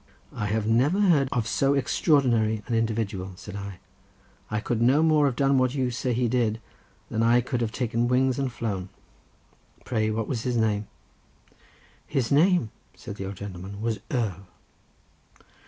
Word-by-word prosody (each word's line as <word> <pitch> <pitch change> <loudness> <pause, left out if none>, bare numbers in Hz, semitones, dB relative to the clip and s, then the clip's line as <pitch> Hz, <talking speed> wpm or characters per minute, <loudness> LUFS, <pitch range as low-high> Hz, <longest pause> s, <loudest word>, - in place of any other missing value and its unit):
"I 105 - -3
have 105 +1 -1
never 130 - +2
heard 160 -10 +4
of 115 -2 -1
so 140 +4 +2
extraordinary 120 -7 +2
an 120 - -3
individual," 110 -4 -1
said 100 +2 -9
I. 100 -2 -6 0.7
"I 105 - -1
could 115 +1 -2
no 135 +6 +4
more 155 -2 +4
have 130 - -1
done 135 0 +3
what 130 +1 +1
you 130 -3 0
say 125 +1 -2
he 120 +1 +1
did, 115 -2 0 0.5
than 110 - 0
I 115 +2 +5
could 125 0 -3
have 115 -2 -1
taken 120 0 -1
wings 130 +1 +2
and 135 -2 -1
flown. 105 -6 -4 1.0
Pray 110 -3 0
what 110 0 -2
was 120 -4 -2
his 125 0 -1
name?" 105 -2 0 1.2
"His 125 -4 -1
name," 160 - +3 0.2
said 105 -4 -9
the 95 - -5
old 100 - -6
gentleman, 95 +1 -8
"was 110 -1 -2
Earl." 100 -7 -2
115 Hz, 165 wpm, -26 LUFS, 105-130 Hz, 1.2 s, I